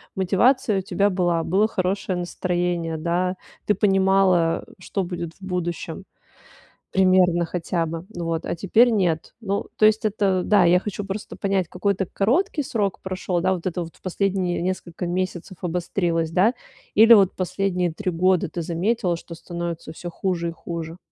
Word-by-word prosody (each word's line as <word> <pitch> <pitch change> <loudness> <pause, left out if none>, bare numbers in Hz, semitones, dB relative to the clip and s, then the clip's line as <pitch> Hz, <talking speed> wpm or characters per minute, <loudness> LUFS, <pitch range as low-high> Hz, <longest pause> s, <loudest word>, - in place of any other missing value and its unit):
мотивация 205 +3 +2
у - - -2
тебя 200 +2 +1
была, 175 -3 +1
было 200 +5 +2
хорошее 185 -2 -1
настроение, 175 -2 -2
да, 175 +3 0 0.3
ты 210 - +3
понимала, 190 -4 +3
что 190 +1 -3
будет 175 -2 -5
в - - -30
будущем, 175 -2 -4 0.9
примерно 185 -2 +4
хотя 170 0 -2
бы. 165 +2 -6
Ну 175 -5 -6
вот, 165 -1 -2
а - - -2
теперь 220 +7 +4
нет. 175 -8 0
Ну, 200 -3 -2
то 215 - +5
есть 215 +1 +4
это, 195 -3 +1
да, 200 -4 +4
я 175 +1 +6
хочу 205 0 -5
просто 200 +2 -6
понять, 195 -3 0
какой-то 190 +1 0
короткий 295 - +1
срок 205 -6 -1
прошёл, 185 -1 -2
да? 185 +2 +2
Вот 175 -1 -6
это 180 -1 -2
вот 165 - -11
в - - -24
последние 185 -1 -1
несколько 180 -1 -3
месяцев 185 0 -3
обострилось, 170 -1 -1
да, 200 +8 +3 0.4
или 225 +2 +8
вот 195 -4 +5
последние 185 -2 -1
3 185 +1 -2
года 180 +1 +2
ты 175 - -4
заметила, 175 +2 0
что 170 0 -9
становится 170 -1 -6
всё 175 +2 -7
хуже 170 -1 -2
и - - -4
хуже? 165 0 -6
185 Hz, 165 wpm, -23 LUFS, 170-195 Hz, 0.9 s, или